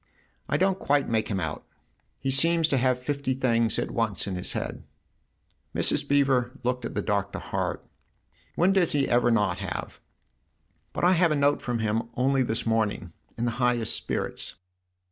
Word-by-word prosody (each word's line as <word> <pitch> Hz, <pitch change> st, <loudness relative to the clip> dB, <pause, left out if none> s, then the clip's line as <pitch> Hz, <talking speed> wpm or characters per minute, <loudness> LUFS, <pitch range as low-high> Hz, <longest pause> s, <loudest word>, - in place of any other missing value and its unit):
" -, -, -38 dB
I 145 Hz, -, +2 dB
don't 190 Hz, +2 st, +1 dB
quite 145 Hz, 0 st, +1 dB
make 110 Hz, -1 st, 0 dB
him 100 Hz, -3 st, -2 dB
out. 80 Hz, -3 st, -4 dB, 0.5 s
He 135 Hz, -, -2 dB
seems 165 Hz, +4 st, +5 dB
to 140 Hz, -, +2 dB
have 130 Hz, 0 st, +2 dB
fifty 135 Hz, 0 st, -2 dB
things 115 Hz, -3 st, +1 dB
at -, -, -2 dB
once 115 Hz, -6 st, -1 dB
in 100 Hz, -, -4 dB
his 90 Hz, 0 st, -2 dB
head." -, -, -4 dB, 0.9 s
Mrs. -, -, +2 dB
Beever 135 Hz, -3 st, +2 dB
looked 125 Hz, 0 st, -1 dB
at -, -, -6 dB
the -, -, -1 dB
Doctor 100 Hz, -2 st, -1 dB
hard. -, -, -3 dB, 0.4 s
" -, -, -37 dB
When 185 Hz, +3 st, +3 dB
does 185 Hz, -4 st, +2 dB
he 140 Hz, -2 st, +2 dB
ever 120 Hz, 0 st, +3 dB
not 105 Hz, -6 st, +1 dB
have? 100 Hz, -2 st, -5 dB, 0.9 s
But -, -, -4 dB
I 180 Hz, -, +6 dB
had 175 Hz, -2 st, +3 dB
a -, -, +2 dB
note 145 Hz, 0 st, +2 dB
from 120 Hz, -1 st, -2 dB
him 110 Hz, +1 st, -1 dB
only 135 Hz, +2 st, +2 dB
this 115 Hz, -2 st, -1 dB
morning 110 Hz, -5 st, -1 dB, 0.2 s
in 115 Hz, -, -1 dB
the 120 Hz, -, 0 dB
highest 120 Hz, -3 st, +1 dB
spirits." -, -, -4 dB
125 Hz, 185 wpm, -26 LUFS, 110-140 Hz, 0.9 s, I